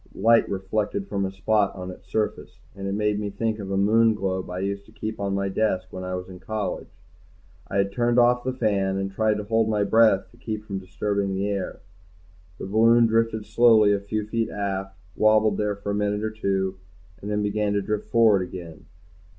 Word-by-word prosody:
Light 115 +4 +4
reflected 100 +1 -2
from 100 -1 -1
a - - -6
spot 100 +1 +1
on 90 -1 -6
its - - -14
surface, 110 -1 -2 0.2
and 100 0 -5
it 100 - -2
made 105 0 0
me 105 -1 -3
think 110 +2 -2
of 100 -2 -6
a 95 - -1
Moonglobe 100 -3 +2
I 90 - -5
used 100 +1 -3
to - - -17
keep 110 0 -6
on 100 -1 -1
my 100 0 -1
desk 95 -2 -1
when 95 0 -6
I 90 0 -3
was 90 0 -6
in 90 -1 -11
college. 110 +2 -4 0.8
I 100 - -3
had 100 0 +1
turned 120 +2 +1
off 120 0 +4
the 130 - -1
fan, 100 -6 0
and 95 0 -2
tried 110 +1 +1
to 105 - -4
hold 110 +1 +1
my 105 -2 +1
breath 110 -2 +3
to 120 - -21
keep 110 -2 -5
from 100 -2 -4
disturbing 100 +1 -2
the 100 +1 -1
air. 100 -2 -4 0.8
The - - -6
balloon 115 +4 +5
drifted 115 -1 +1
slowly 110 -1 +5
a 100 - +1
few 105 +1 -3
feet 115 +1 -1
aft, 95 -1 -4 0.2
wobbled 110 -1 +3
there 105 -1 0
for 100 0 -5
a - - -1
minute 105 0 -1
or 110 - -1
two, 95 -3 -2 0.4
then 105 +1 -2
began 105 0 0
to 100 - +1
drift 105 +1 -3
forward 110 -4 +4
again. 90 -3 -8
105 Hz, 205 wpm, -24 LUFS, 95-110 Hz, 0.8 s, balloon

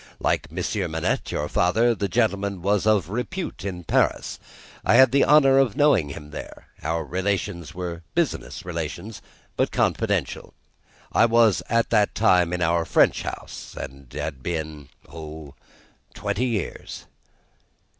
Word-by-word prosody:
Like 80 - 0
Monsieur 90 +3 -2
Manette, 80 0 -2
your 75 - -2
father, 110 +10 +2
the 100 -3 -2
gentleman 100 0 0
was 100 +1 +1
of 100 -6 +3
repute 125 - -4
in 90 -3 -5
Paris. - - 0 0.4
I - - +3
had 130 -2 +7
the 140 - +4
honour 135 -2 +6
of 130 -7 +2
knowing 130 - +4
him 75 +1 -9
there. - - -9 0.2
Our 80 +1 -2
relations 95 -3 -2
were 85 -2 -5
business 145 - -2
relations, 85 +5 -5 0.3
but - - +1
confidential. - - -1 0.6
I 115 - +4
was 115 -3 +4
at 115 0 +1
that 105 -3 +3
time 90 -5 +3
in 90 0 -1
our 85 0 +2
French 80 - +3
House, - - -7
and 70 -2 -9
had 70 -5 -4
been 80 -3 -4 0.2
oh! 80 -3 -9 0.6
twenty 125 - -1
years." 110 -7 -4
90 Hz, 140 wpm, -24 LUFS, 80-110 Hz, 0.6 s, had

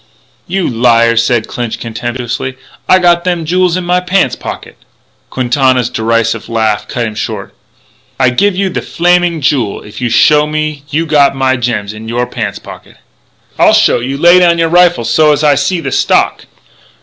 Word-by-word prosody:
"You 190 0 -1
liar," 115 -1 +2
said 115 0 +1
Clinch 120 -2 -5
contemptuously, 120 +2 -5 0.3
"I 185 - +6
got 175 -1 +2
them 175 -3 -2
jools 180 +1 +1
in 185 - -3
my 180 +1 +1
pants 185 +1 0
pocket - - -8 0.3
" - - -42
Quintana's 130 -1 0
derisive 115 -1 -1
laugh 110 -2 -1
cut 120 -2 -3
him 110 - -5
short: 105 -2 -5 0.7
"I 130 -2 +3
give 200 +10 +1
you 195 0 -1
thee 180 - -4
Flaming 175 -1 0
Jewel 130 -7 -1
if 105 +4 -11
you 125 - -1
show 150 +5 +3
me 155 -1 -3
you 160 +3 -1
got 145 -3 +2
my 130 -1 +1
gems 115 -4 -3
in 110 +1 -10
you 120 +2 -1
pants 115 -4 -5
pocket!" - - -13 0.6
"I'll - - +5
show - - +3
you. 130 +3 -4
Lay 175 +4 +5
down 170 -1 +3
your 165 -1 +1
rifle 175 -7 +3
so's 150 +4 +2
I 150 -1 +4
see 170 +6 -1
the - - -4
stock." - - +1
130 Hz, 175 wpm, -11 LUFS, 115-170 Hz, 0.7 s, I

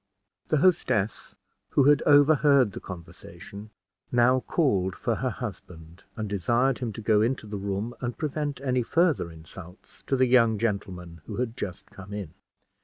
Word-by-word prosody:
The 155 - +2
hostess, 140 - +1 0.3
who 140 - +3
had 145 +1 +5
overheard 145 -4 +5
the - - -7
conversation, 100 +3 -10 0.4
now 125 +1 +4
called 100 - 0
for - - -2
her - - -1
husband, 80 +1 -9
and 110 -2 -4
desired 120 +7 +1
him 120 -4 -3
to 110 - -7
go 105 -1 +3
into 120 +1 0
the 105 -1 -6
room 100 +4 -3
and 120 -3 -4
prevent 150 -2 -3
any 130 -2 0
further 160 - +1
insults 85 +3 -13
to 135 - +1
the 130 0 +3
young 115 -3 +4
gentleman 95 -6 -4
who - - -5
had 120 -2 -3
just 100 -6 -7
come 95 +1 -11
in. 100 -7 -6
115 Hz, 160 wpm, -26 LUFS, 95-135 Hz, 0.4 s, had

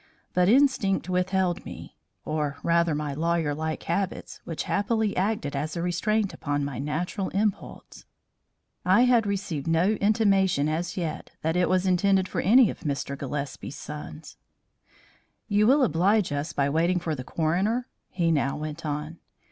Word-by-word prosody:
But 180 +1 +3
instinct 230 -8 +3
withheld 185 -1 0
me, - - -10 0.3
or 150 -2 -2
rather 170 -2 +2
my 150 -1 -3
lawyer 165 0 0
like 155 +1 -3
habits 190 +3 -3
which 165 - -4
happily 220 0 0
acted 190 -7 -1
as 155 +4 -3
a 170 - -2
restraint 200 +4 0
upon 145 -1 -2
my 140 -4 -5
natural 170 +7 -2
impulse. 205 0 -3 0.8
I 185 +5 +4
had 240 -4 +4
received 190 -8 -3
no 165 +5 +3
intimation 200 -7 +2
as 165 +4 -2
yet 165 -4 -4
that 160 +1 0
it 180 0 +2
was 185 0 +2
intended 190 +1 +2
for - - -2
any 235 +3 +5
of - - -11
Mr. 140 -1 -3
Gillespie's 140 0 -5
sons. 150 +1 -9 1.1
"You 210 0 +3
will 275 +3 +5
oblige 190 - +2
us 145 +1 -2
by 140 -1 0
waiting 165 +5 +1
for 170 -2 -3
the 130 -4 -5
coroner?" 190 - 0 0.2
he 170 -2 0
now 140 -3 0
went 155 +2 -6
on. 150 +2 -4
175 Hz, 155 wpm, -26 LUFS, 150-200 Hz, 1.1 s, any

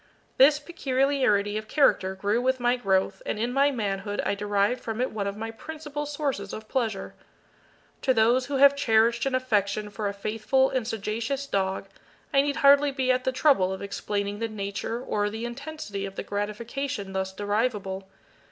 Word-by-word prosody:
This 285 +3 +7
peculiarity 265 - +1
of 215 - -11
character 190 -9 +2
grew 205 +5 0
with 260 +1 +1
my 245 0 +2
growth, 190 -4 0
and - - -3
in 235 +3 -1
my 280 +2 +4
manhood 205 -5 -3
I - - +1
derived 205 +3 0
from 225 0 -4
it 255 - 0
one 205 -2 -3
of 200 +1 -4
my 225 +1 -4
principal 295 +3 -6
sources 280 -9 -3
of 215 0 -7
pleasure. 225 -7 -2 0.9
To 265 - +2
those 245 +2 +3
who 285 - -3
have 280 +1 +6
cherished 230 -2 +3
an 265 - 0
affection 210 -4 0
for 205 +1 -3
a - - -4
faithful 225 +6 +1
and 250 -4 -1
sagacious 225 +5 -2
dog, 190 -6 -1 0.5
I 275 - +6
need 285 0 -1
hardly 285 +1 +6
be 265 -2 +1
at 255 0 0
the 260 - +2
trouble 255 -9 +3
of 190 - -5
explaining 200 0 -3
the 230 - -1
nature 200 +1 -4
or 205 -4 -1
the 220 +2 -5
intensity 240 -6 -5
of 195 - -10
the - - -4
gratification 210 +1 -4
thus 190 0 -2
derivable. 205 -1 -2
225 Hz, 180 wpm, -26 LUFS, 205-265 Hz, 0.9 s, This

